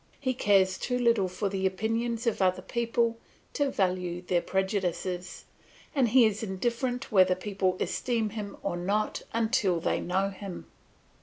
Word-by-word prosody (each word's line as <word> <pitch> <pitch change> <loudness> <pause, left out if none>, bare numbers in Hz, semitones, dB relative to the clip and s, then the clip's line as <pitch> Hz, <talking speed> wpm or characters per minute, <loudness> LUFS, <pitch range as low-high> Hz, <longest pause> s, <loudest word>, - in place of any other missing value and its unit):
He 260 -2 0
cares 195 -5 +3
too 250 0 -1
little 235 -6 +3
for 185 +3 -2
the 190 -1 0
opinions 225 +5 -1
of 230 -4 0
other 185 -1 +2
people 230 -1 0 0.3
to 285 -1 +1
value 180 -4 -1
their 180 -1 +1
prejudices, 185 -2 -2 0.5
and 265 -5 +3
he 245 +1 +6
is 215 -1 0
indifferent 235 +5 -2
whether 185 -3 +5
people 185 -1 -1
esteem 230 -4 -1
him 205 -2 -6
or 195 - -1
not 200 +5 -1
until 220 -6 +1
they - - 0
know 190 +2 0
him. 195 -1 -8
200 Hz, 150 wpm, -28 LUFS, 185-230 Hz, 0.5 s, he